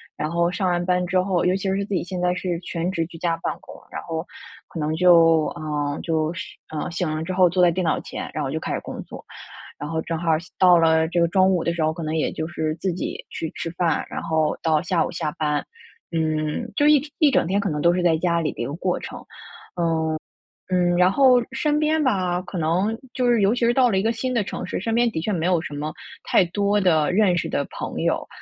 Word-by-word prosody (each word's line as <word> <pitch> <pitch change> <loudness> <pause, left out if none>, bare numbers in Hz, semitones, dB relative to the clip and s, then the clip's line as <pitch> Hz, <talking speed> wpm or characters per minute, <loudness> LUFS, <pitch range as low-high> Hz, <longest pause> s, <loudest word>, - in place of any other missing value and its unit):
然 155 - -3
后 170 0 +2
上 185 +1 -1
完 175 0 0
班 180 -1 +1
之 185 0 +2
后， 185 -2 +1
尤 180 +1 +3
其 - - -8
是 200 - -1
自 205 - -5
己 185 - +1
现 180 -1 -4
在 180 0 +2
是 180 -1 -2
全 175 0 -3
职 165 -3 -1
居 165 - -11
家 165 0 0
办 - - 0
公， - - -13 0.2
然 - - -5
后， 165 0 -4 0.4
可 165 - -7
能 155 +1 -1
就 165 -2 +5
呃， 145 -1 -2
就 160 -1 0
是 185 - -7
呃， 155 -1 -4
醒 175 -1 -2
了 155 - -3
之 185 +3 -4
后 180 -1 +5
坐 180 +2 +1
在 175 - +6
电 185 +2 -1
脑 160 - +1
前， - - -6
然 - - -2
后 - - -3
就 - - -3
开 - - -3
始 - - -1
工 - - -7
作。 - - -11 0.5
然 145 - -5
后 160 -1 -1
正 165 0 -3
好 170 -1 +1 0.3
到 180 -2 +6
了 160 -1 +3
这 170 +1 0
个 170 - +4
中 190 +2 +4
午 180 -3 +1
的 170 - 0
时 170 - -3
候， 155 0 +1
可 165 0 -6
能 155 0 -2
也 160 - 0
就 160 - -3
是 155 -2 -2
自 190 +3 -2
己 180 - -4
去 160 - -4
吃 165 - -4
饭， 170 -3 0
然 - - -4
后 160 -2 0
到 155 -2 +2
下 175 -1 +1
午 - - -4
下 150 - -3
班。 150 -2 0 0.5
嗯， 155 -2 -1
就 290 - +2
一 300 -2 +6 0.2
一 300 -4 +5
整 165 - +2
天 195 +3 +1
可 200 - -1
能 150 -2 -2
都 170 0 +4
是 180 0 0
在 165 -2 +3
家 170 0 +1
里 155 - -1
的 - - -15
一 - - -1
个 140 - -5
过 180 +2 -1
程。 - - -8 1.5
嗯， 180 -1 +2
嗯， - - +1
然 180 +1 +5
后 260 +3 +5 0.2
身 295 +3 0
边 310 0 +2
吧， 185 -8 +1
可 185 +1 -7
能 180 +7 0 0.2
就 250 -2 +1
是 235 -3 +3
尤 200 +2 +4
其 245 - -2
是 235 - +4
到 250 -3 +4
了 195 - +1
一 - - +1
个 225 +3 +1
新 255 +3 -3
的 230 -4 +1
城 185 - -5
市， 185 - -3
身 225 +3 -1
边 240 0 +3
的 160 - -3
确 210 - -2
没 170 -4 -1
有 180 -3 +2
什 160 - -7
么 150 +2 -4 0.3
太 - - +4
多 205 +3 +1
的 160 -5 +3
认 185 -2 +3
识 - - -1
的 140 - -1
朋 - - -5
友。 - - 0
175 Hz, 280 characters per minute, -23 LUFS, 160-190 Hz, 1.5 s, 在